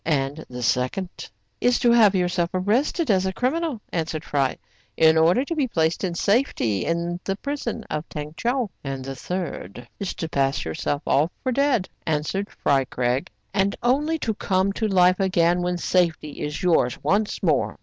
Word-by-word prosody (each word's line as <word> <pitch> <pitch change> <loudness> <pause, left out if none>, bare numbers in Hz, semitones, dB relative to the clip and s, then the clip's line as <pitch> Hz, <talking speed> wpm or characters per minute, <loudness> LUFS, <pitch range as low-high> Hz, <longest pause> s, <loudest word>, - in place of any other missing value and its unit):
"And 145 0 -1
the 125 -1 -6
second?*' 130 +11 -1 0.3
"Is 245 0 +3
to 240 - +3
have 215 -4 +6
yourself 175 -1 +1
arrested 235 - +1
as 190 -1 +2
a - - 0
criminal,'* 275 - -1
answered 160 -2 -2
Fry, 135 -3 0 0.4
"in 160 0 +6
order 170 +11 +4
to 335 - -3
be 290 -4 +1
placed 160 -6 0
in 180 -3 -1
safety 200 - +1
in 170 +1 -1
the 195 - -1
prison 280 0 -4
of 155 +2 -4
Tong 150 0 -6
Tcheou.*' 240 +3 -1
" - - -46
And 135 -2 -4
the 135 0 -5
third? 125 - -5
"Is 200 - -3
to 165 - -4
pass 135 -3 0
yourself 80 - -2
off 150 +4 +3
for 260 - 0
dead," 260 -6 +2 0.2
answered 160 +6 -1
Fry 135 -2 +1
Craig, 125 +1 -1
" 110 - -44
and 195 0 +1
only 295 +6 +2
to 225 -7 -1
come 190 -1 0
to 220 +2 -1
life 185 -1 +4
again 175 -2 +2
when 180 0 -1
safety 165 -4 0
is 150 +3 -4
yours 160 -9 +3
once 205 +1 0
more. - - +1
180 Hz, 180 wpm, -24 LUFS, 150-215 Hz, 0.4 s, have